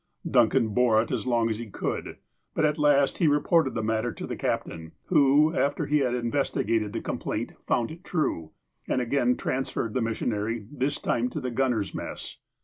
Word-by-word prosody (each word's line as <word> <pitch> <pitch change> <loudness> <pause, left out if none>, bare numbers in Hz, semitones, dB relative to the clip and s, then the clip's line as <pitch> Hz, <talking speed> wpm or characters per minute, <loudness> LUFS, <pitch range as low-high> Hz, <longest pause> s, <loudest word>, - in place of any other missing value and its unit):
Duncan 110 - +3
bore 115 0 +3
it 115 - -8
as - - -2
long 120 -2 +2
as 110 -1 -2
he 120 - -6
could. - - -4 0.4
But - - +2
at 150 0 +1
last 145 -2 +3
he 170 - +4
re 145 0 +4
ported 160 -5 +2
the 110 - -1
matter 110 +2 0
to - - -7
the - - -4
captain, 80 -1 -3 0.2
who, 150 -1 +5
after 140 -2 0
he 150 +1 +2
had 125 -3 +1
in 120 -1 -2
vestigated 115 -6 0
the 115 - -4
complaint, - - -3
fouud 120 +2 +1
it 170 +3 -11
true, 145 - -1 0.4
and - - +1
again 125 0 +1
trans 130 +1 -2
ferred 115 -2 -3
the 130 - 0
missionary, 115 -1 -2
this 145 0 -1
time 120 +1 0
to - - -4
the 125 - -3
gunners' 120 -5 0
mess. - - -6
125 Hz, 200 wpm, -27 LUFS, 115-145 Hz, 0.4 s, who